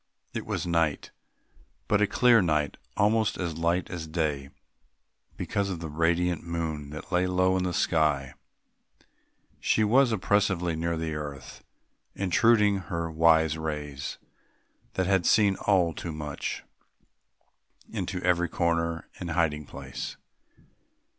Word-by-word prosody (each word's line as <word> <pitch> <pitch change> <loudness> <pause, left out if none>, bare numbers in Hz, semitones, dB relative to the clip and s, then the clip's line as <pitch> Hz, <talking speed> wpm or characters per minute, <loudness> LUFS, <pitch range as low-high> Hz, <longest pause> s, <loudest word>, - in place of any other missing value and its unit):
It - - -5
was - - -2
night 85 -3 0 0.8
but 105 0 +2
a 105 - +4
clear 120 +2 +5
night; 75 -4 0 0.2
almost 105 +1 +2
as 85 -3 -3
light 85 +2 +1
as 85 -3 -5
day 75 -4 -2 0.9
because 100 -1 -1
of 90 -3 -4
the 80 -1 -5
radiant 85 +2 +1
moon 80 -4 -3
that 80 +4 -9
lay 90 0 +2
low 90 0 +2
in 90 0 0
the 90 - -1
sky; 75 -6 +1 1.3
she 110 - +2
was 125 +4 +4
oppressively 95 -4 +1
near 85 +1 -1
the 80 -1 -3
earth, 70 -3 -7 0.5
intruding 105 +2 +3
her 85 -3 -4
wise 80 -1 +4
rays, 75 -3 -4 0.8
that 95 - +1
had 95 -1 +2
seen 100 -2 +4
all 90 -5 +3
too 85 - -5
much, 75 -2 -5 1.3
into 90 - -3
every 90 -1 +2
corner 85 -1 -1
and 90 - -5
hiding 80 -3 0
place. - - -7
85 Hz, 125 wpm, -27 LUFS, 80-95 Hz, 1.3 s, clear